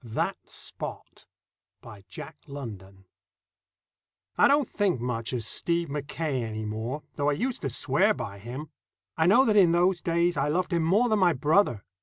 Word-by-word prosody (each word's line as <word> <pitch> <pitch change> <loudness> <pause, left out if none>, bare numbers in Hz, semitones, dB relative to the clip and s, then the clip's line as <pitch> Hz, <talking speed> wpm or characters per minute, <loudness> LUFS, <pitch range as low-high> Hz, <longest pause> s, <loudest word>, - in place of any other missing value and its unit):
That 115 -2 -3
Spot - - -7 0.5
By 105 -4 -13
Jack - - -9
London 100 -9 -9 1.3
I - - +6
DON'T 285 -2 +3
think 200 - 0
much 115 -2 -3
of 125 -3 -2
Stephen 170 +6 -1
Mackaye 145 -1 -2
any 110 -1 -4
more, 115 +7 -4
though 145 0 +1
I - - +2
used 250 - -2
to 135 - -2
swear - - +2
by 100 0 -6
him. 130 +8 -7 0.4
I 160 0 +2
know 245 +8 +6
that 215 - +2
in 180 -5 +6
those 175 +1 +2
days 170 +1 +1
I - - +1
loved 175 +4 0
him 170 - +2
more 195 +10 +3
than 215 -2 +2
my 180 -3 +4
brother. 145 - +2
150 Hz, 170 wpm, -27 LUFS, 115-175 Hz, 1.3 s, I